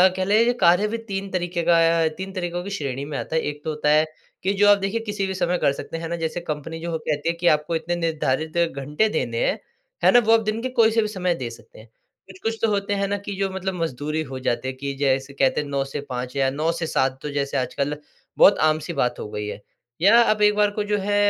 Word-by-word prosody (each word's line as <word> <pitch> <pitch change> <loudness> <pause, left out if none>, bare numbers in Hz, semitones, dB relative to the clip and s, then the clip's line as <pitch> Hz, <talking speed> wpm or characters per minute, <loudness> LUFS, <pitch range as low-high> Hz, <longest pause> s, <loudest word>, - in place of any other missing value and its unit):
कहले 215 +6 +3
कार्य 180 -1 +4
भी 230 +2 -3
3 200 -3 -5
तरीक़े 175 -1 -2
का 170 0 +4 0.3
अ, - - +4
3 190 0 -6
तरीक़ों 175 -1 -3
की 200 - -6
श्रेणी 140 -1 -4
में 145 -2 -5
आता 160 - -4
है, 160 - +3
एक 145 0 -5
तो 160 - -3
होता 150 -1 0
है 155 +1 +5 0.4
कि 195 +2 +1
जो 205 +1 +3
आप 205 - +7
देखिए 195 +3 -2
किसी 205 -3 -3
भी 190 - -3
समय 180 -1 0
कर 140 - +2
सकते, 145 +4 -6
हैं 165 0 -5
ना? 170 - -1
जैसे 170 +2 -3
कंपनी 160 +2 -4
जो 170 +1 -4
हो 160 - -1
कहती 150 +1 0
है 170 - -1
कि 175 +1 -1
आपको 155 +3 -4
इतने 165 +2 -2
निर्धारित 160 -1 -1
घंटे 150 +4 +1
देने - - -1
हैं, - - 0 0.4
है - - +7
ना 245 - +7
वो 225 - +6
आप 225 - +5
दिन 220 +2 -2
के 255 - -2
कोई 220 0 +5
से 225 0 +3
भी 215 - -1
समय 180 -4 -1
दे 125 -6 -5
सकते 115 -2 -14
हैं। 110 - -14 0.4
कुछ-कुछ 225 +4 -4
तो 225 - +3
होते 200 0 0
हैं 200 0 0
ना 205 +1 -1
कि 200 0 -6
जो 195 -1 +1
मतलब 190 0 -3
मजदूर 150 0 -3
ही 160 - +1
हो 130 - -4
जाती 120 +2 0
है 130 - -2
कि 140 +1 -5
जैसे 135 0 0
कहते 135 +1 +2
हैं 145 - -7
9 140 -1 -1
से 145 - -1
5 125 +1 -4
या 135 -1 +2
9 155 +4 0
से 165 - -1
7 130 -2 0
तो 150 - -4
जैसे 140 -1 -1
आजकल 140 +3 -2 0.4
बहुत 205 - +7
आम-सी 155 +2 -2
बात 125 -4 0
हो 105 - -6
गई 105 0 -4
है। 105 - -6 0.4
या 205 +5 +7
आप 215 -2 +2
एक 210 0 +5
बार 210 0 +3
को 210 0 -2
जो 210 - +2
है 205 +1 0
170 Hz, 270 wpm, -23 LUFS, 145-200 Hz, 0.4 s, आप